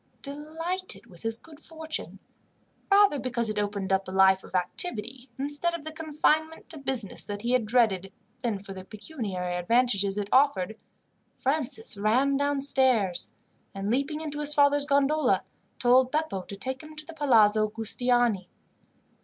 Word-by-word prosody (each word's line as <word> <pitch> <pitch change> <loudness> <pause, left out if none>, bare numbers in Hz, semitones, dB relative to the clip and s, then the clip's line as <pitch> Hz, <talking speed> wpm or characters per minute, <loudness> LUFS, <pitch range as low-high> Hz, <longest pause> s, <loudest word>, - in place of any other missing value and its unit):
Delighted 320 +6 -4
with 175 -2 -16
his 225 0 0
good 310 +3 -15
fortune 320 -1 -6 0.7
rather 400 -7 +5
because 235 -4 -1
it 210 - -2
opened 200 -2 -2
up 190 0 0
a - - -6
life 190 0 +4
of - - -9
activity, 240 - -3
instead 290 +5 -1
of 330 - -7
the 315 - -4
confinement 315 0 0
to 320 -2 -8
business 260 -7 -2
that 205 +1 -5
he 240 - 0
had 250 -4 +2
dreaded, 210 -5 +2 0.3
than 230 -5 -1
for 195 0 -9
the 190 -1 -9
pecuniary 200 - -5
advantages 200 +1 +1
it 205 -1 -2
offered 220 -7 +3 0.6
Francis 260 -6 0
ran 250 +7 +2
downstairs 270 -8 +1 0.5
and, 195 +2 -2
leaping 280 +5 -1
into 295 -2 -5
his 295 0 +4
father's 285 0 +4
gondola, 285 +2 +2 0.3
told 250 +1 +4
Beppo 305 -10 -1
to 200 - -7
take 260 +6 -3
him 310 0 -12
to 305 0 -8
the 330 - -10
Palazzo 220 -8 +4
Giustiniani. 225 -2 0
255 Hz, 155 wpm, -27 LUFS, 205-295 Hz, 0.7 s, rather